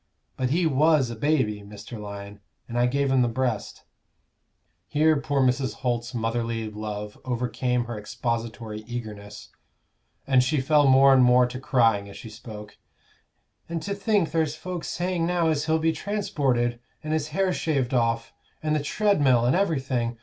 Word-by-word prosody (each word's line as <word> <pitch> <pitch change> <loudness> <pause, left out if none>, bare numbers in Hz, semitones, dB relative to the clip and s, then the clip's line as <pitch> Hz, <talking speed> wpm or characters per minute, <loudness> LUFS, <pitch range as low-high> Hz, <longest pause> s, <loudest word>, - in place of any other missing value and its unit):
But 130 -1 -1
he 170 +5 +1
was 150 -3 +3
a - - -5
baby, 120 -5 0
Mr. 105 +3 -10
Lyon, 100 0 -8 0.3
and 120 - -7
I 120 0 +3
gave 140 +1 0
him 130 -1 +4
the 120 - +3
breast," 120 -2 -2 1.0
here 155 +1 +3
poor 140 0 0
Mrs. 130 -2 +1
Holt's 120 -1 -2
motherly 115 0 -2
love 105 -1 -6
over 125 -1 -2
came 125 +1 -1
her 115 -2 -5
expository 115 0 -4
eagerness, 105 -3 -7 0.8
and 130 -2 +4
she 145 +4 +1
fell 145 +2 +4
more 135 +1 +7
and 130 -1 +6
more 125 0 +5
to 125 +1 -5
crying 115 -7 +2
as 100 - -11
she 110 - -10
spoke 105 -1 -10 0.9
"And 170 0 -2
to 200 - -2
think 200 -3 +1
there's 160 -2 0
folks 180 +1 -6
saying 175 -1 -1
now 175 -2 +1
as 150 -2 0
he'll 160 0 +3
be 160 0 +2
transported, 140 - -1 0.2
and 155 0 -2
his 155 -2 0
hair 185 +4 0
shaved 140 -7 -1
off, 115 -1 0 0.3
and 155 0 +1
the - - +2
treadmill, 145 - +2
and 125 - +3
everything. 130 -10 0
125 Hz, 165 wpm, -25 LUFS, 115-155 Hz, 1.0 s, more